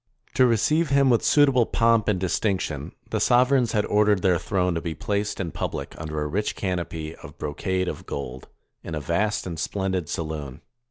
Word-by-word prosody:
To 130 - +5
receive 150 +8 +2
him 140 -1 +4
with 115 - +3
suitable 135 -5 +4
pomp 115 -2 +3
and 105 -4 +1
distinction, 90 -6 -1 0.2
the - - 0
sovereigns 125 -1 +3
had 105 -2 +2
ordered 105 -2 +3
their 90 -3 +3
throne 90 -3 0
to 85 - -2
be 80 -2 -4
placed 100 +5 -2
in 85 -4 -3
public - - -4
under 75 -1 -3
a - - -2
rich 100 +7 -1
canopy 85 -4 -3
of - - -12
brocade 95 +5 -2
of - - -5
gold, 65 -2 -6 0.4
in 80 - -5
a - - -2
vast 85 +8 0
and 85 -3 -5
splendid 95 -1 -2
saloon. 75 -5 -5
95 Hz, 180 wpm, -25 LUFS, 80-110 Hz, 0.4 s, To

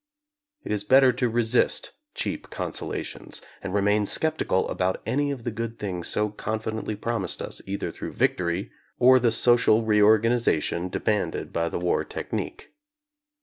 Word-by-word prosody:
It - - -5
is 105 -1 -1
better 130 +3 +5
to 125 0 0
resist 115 +1 +2 0.2
cheap - - -3
consolations, - - -4 0.2
and 95 - -5
remain 105 +1 +2
skeptical 155 -12 +1
about 95 0 -1
any 145 +2 0
of 135 -4 -4
the 120 - -2
good 115 +1 -5
things 90 -4 -3
so 105 0 +1
confidently 110 +1 -4
promised 115 +3 -3
us - - -4
either 100 +1 -3
through - - -7
victory 90 +2 0 0.3
or 130 +1 +6
the 120 -2 +2
social 115 -1 +4
reorganization 105 -4 +3
de - - -4
manded 105 -2 -1
by 85 0 0
the - - -3
war 90 0 0
technique. - - -5
110 Hz, 145 wpm, -25 LUFS, 100-120 Hz, 0.3 s, or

